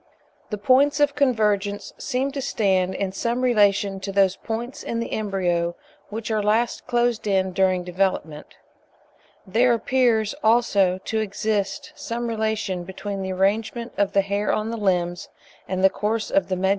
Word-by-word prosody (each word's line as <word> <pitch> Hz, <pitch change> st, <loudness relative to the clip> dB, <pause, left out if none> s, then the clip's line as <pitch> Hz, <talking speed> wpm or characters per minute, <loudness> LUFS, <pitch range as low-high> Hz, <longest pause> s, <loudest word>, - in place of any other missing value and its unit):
The 210 Hz, -, -3 dB
points 265 Hz, +7 st, +3 dB
of 290 Hz, -1 st, +3 dB
convergence 210 Hz, -7 st, 0 dB
seem 265 Hz, +2 st, -1 dB
to 275 Hz, 0 st, -4 dB
stand 190 Hz, -6 st, +1 dB
in 195 Hz, -1 st, -2 dB
some 235 Hz, +5 st, -2 dB
relation 205 Hz, -4 st, +3 dB
to 195 Hz, +1 st, -5 dB
those 195 Hz, -1 st, +3 dB
points 240 Hz, +6 st, -5 dB
in 230 Hz, -, -3 dB
the 230 Hz, -, -4 dB
embryo 175 Hz, -5 st, -1 dB, 0.3 s
which 220 Hz, +1 st, -5 dB
are 215 Hz, -1 st, +1 dB
last 220 Hz, +3 st, 0 dB
closed 240 Hz, -2 st, +1 dB
in 190 Hz, -2 st, +1 dB
during 185 Hz, -1 st, +2 dB
development. 180 Hz, -4 st, -2 dB, 0.9 s
There 235 Hz, +5 st, +3 dB
appears, 230 Hz, -2 st, +1 dB
also, 205 Hz, -5 st, +3 dB
to 220 Hz, -, -1 dB
exist 200 Hz, -1 st, -2 dB
some 235 Hz, +1 st, -4 dB
relation 220 Hz, -5 st, -2 dB
between 195 Hz, +2 st, -5 dB
the 190 Hz, 0 st, -3 dB
arrangement 220 Hz, +5 st, 0 dB
of 200 Hz, -1 st, 0 dB
the 200 Hz, -, +4 dB
hair 200 Hz, +1 st, -1 dB
on 215 Hz, +1 st, -1 dB
the 230 Hz, -, -4 dB
limbs, 175 Hz, -4 st, -1 dB, 0.4 s
and 185 Hz, 0 st, -2 dB
the 190 Hz, -, +7 dB
course 215 Hz, +2 st, -2 dB
of 290 Hz, -, +2 dB
the 185 Hz, -, 0 dB
medullary 185 Hz, +1 st, 0 dB
arteries. -, -, +2 dB
210 Hz, 165 wpm, -23 LUFS, 190-230 Hz, 0.9 s, the